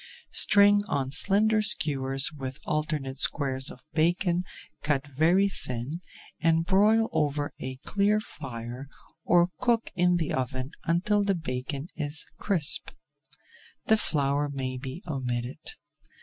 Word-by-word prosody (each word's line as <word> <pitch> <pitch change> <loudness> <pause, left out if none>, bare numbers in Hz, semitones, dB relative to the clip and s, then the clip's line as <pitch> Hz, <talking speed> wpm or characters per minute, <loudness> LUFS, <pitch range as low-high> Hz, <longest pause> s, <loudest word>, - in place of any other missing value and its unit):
String 205 0 +5
on 135 -5 -1
slender 210 +8 +5
skewers 135 -10 +2
with 135 -2 -6
alternate 150 -3 -2
squares 135 -2 +2
of 125 - -12
bacon 175 +2 +1 0.4
cut 145 -2 0
very 160 +8 +2
thin 135 -2 -5 0.4
and 165 0 +2
broil 215 +4 +4
over 145 -1 -1
a 130 0 -5
clear 205 +1 +2
fire 125 - -8 0.4
or 175 0 +4
cook 235 -2 +1
in 180 0 +2
the 165 -3 -2
oven 130 +1 -3
until 205 +5 +2
the 200 -1 +1
bacon 135 -1 -4
is 150 -1 -2
crisp. 175 -8 +1 1.0
The 220 - +5
flour 145 -6 0
may 130 -2 -4
be 130 - -7
omitted. 125 -3 -3
150 Hz, 120 wpm, -27 LUFS, 135-190 Hz, 1.0 s, String